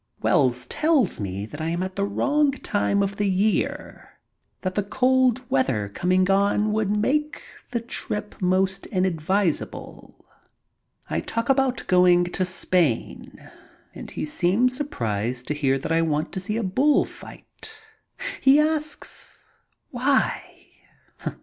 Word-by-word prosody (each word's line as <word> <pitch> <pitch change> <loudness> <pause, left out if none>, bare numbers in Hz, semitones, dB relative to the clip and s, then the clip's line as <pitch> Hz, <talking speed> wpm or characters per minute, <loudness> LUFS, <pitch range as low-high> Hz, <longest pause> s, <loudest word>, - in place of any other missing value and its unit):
Wells 125 -3 +2
tells 300 - +1
me 100 0 -4
that 145 +8 -9
I 160 - -1
am 170 +2 -1
at 185 0 -5
the 200 - -1
wrong 285 +7 +1
time 205 -5 0
of 200 0 -3
the 205 -1 +1
year, 195 +3 -1 0.4
that 185 -1 -2
the 205 - 0
cold 255 +3 +2
weather 125 - 0
coming 185 - +1
on 200 +2 +2
would 215 -2 0
make 290 +9 0 0.3
the 235 -1 -2
trip 210 -3 -5
most 190 +1 +1
inadvisable. 185 -1 -2 0.8
I - - -1
talk 230 +2 -3
about 265 -2 +1
going 180 -1 +5
to 175 +1 -2
Spain, 180 -7 -1 0.4
and - - -9
he - - -4
seems 195 +11 +1
surprised 120 - -3
to - - +1
hear 135 -2 +1
that 135 - -5
I 165 0 +3
want 155 -1 -1
to 190 - -4
see 210 +4 -3
a 230 - -1
bull 260 +10 +3
fight. - - -13 0.6
He 270 +2 +6
asks, 305 0 -3 0.5
"Why?" 260 +2 -1
195 Hz, 135 wpm, -24 LUFS, 165-245 Hz, 0.8 s, He